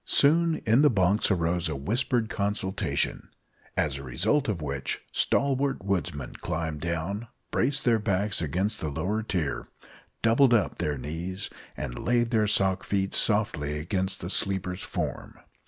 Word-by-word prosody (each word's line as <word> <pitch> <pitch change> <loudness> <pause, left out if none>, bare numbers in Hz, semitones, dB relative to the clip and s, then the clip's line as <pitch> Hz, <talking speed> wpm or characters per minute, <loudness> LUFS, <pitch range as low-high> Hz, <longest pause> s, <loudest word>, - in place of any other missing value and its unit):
Soon 165 +3 +3
in 115 +4 +5
the 150 - +6
bunks 100 -2 +2
arose 85 -3 +1
a 80 - -2
whispered 115 - 0
consultation, 100 -2 -1 0.5
as 70 -3 +1
a - - -8
result 135 - +1
of 100 -5 -1
which 70 -3 -3
stalwart 140 -4 +1
woodsmen 85 -9 -2
climbed 80 -3 -3
down, 85 +7 -2 0.2
braced 135 +3 +1
their 115 -2 +4
backs 100 -2 0
against 90 +8 -1
the 80 - -2
lower 90 +9 -1
tier, 85 -10 -2 0.6
doubled 120 +2 +5
up 105 - 0
their 75 -1 -1
knees, 85 +8 -4 0.3
and - - -5
laid 120 -1 +2
their 110 -3 +3
sock 95 -2 +2
feet 95 -1 -1
softly 80 -9 +1
against 95 +4 -1
the 85 - -4
sleeper's 95 -2 0
form. - - -4
95 Hz, 145 wpm, -27 LUFS, 80-115 Hz, 0.6 s, the